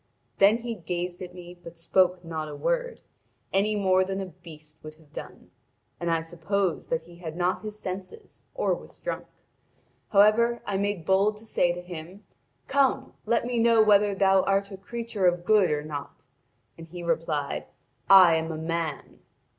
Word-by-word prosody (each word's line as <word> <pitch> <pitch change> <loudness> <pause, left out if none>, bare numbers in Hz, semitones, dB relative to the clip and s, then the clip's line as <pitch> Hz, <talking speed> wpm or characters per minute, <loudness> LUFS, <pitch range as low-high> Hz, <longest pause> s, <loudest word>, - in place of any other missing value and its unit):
Then 200 +3 +6
he 235 0 -5
gazed 180 -1 -4
at 180 -1 -8
me 175 -1 -10
but 175 -1 -13
spoke 180 +1 +2
not 160 -2 -4
a 145 - -7
word, - - -2 0.5
any 210 +2 +2
more 185 -2 +3
than 190 +1 -3
a 195 - -3
beast 155 -4 -13
would 155 0 -10
have 155 -2 -24
done. - - -10 0.5
And 170 - -2
I 165 -1 +1
supposed 175 +2 -2
that 160 -1 -1
he 170 +1 -15
had 165 -2 -7
not 180 +1 0
his 215 -1 -7
senses 190 - -8
or - - +1
was - - -9
drunk. - - -5 0.8
However, 215 +4 +4
I 200 - -1
made 200 -4 -2
bold 195 +3 +2
to 220 - -15
say 175 -5 +1
to 175 - -7
him: 180 +3 -9 0.4
'Come, 275 -1 +1
let 235 +1 +2
me 245 -1 -1
know 230 -1 +5
whether 205 -1 +4
thou 195 -1 +4
art 195 +1 +1
a 195 - -7
creature 230 -1 -2
of 175 0 0
good 210 -3 +4
or 150 0 -1
not.' 145 -2 -7 0.6
And 165 - -10
he 175 +1 -8
replied: 160 -4 -2 0.4
'I 185 -4 +8
am 160 0 -3
a 160 - -4
man.' 160 -2 -4
185 Hz, 180 wpm, -26 LUFS, 165-205 Hz, 0.8 s, I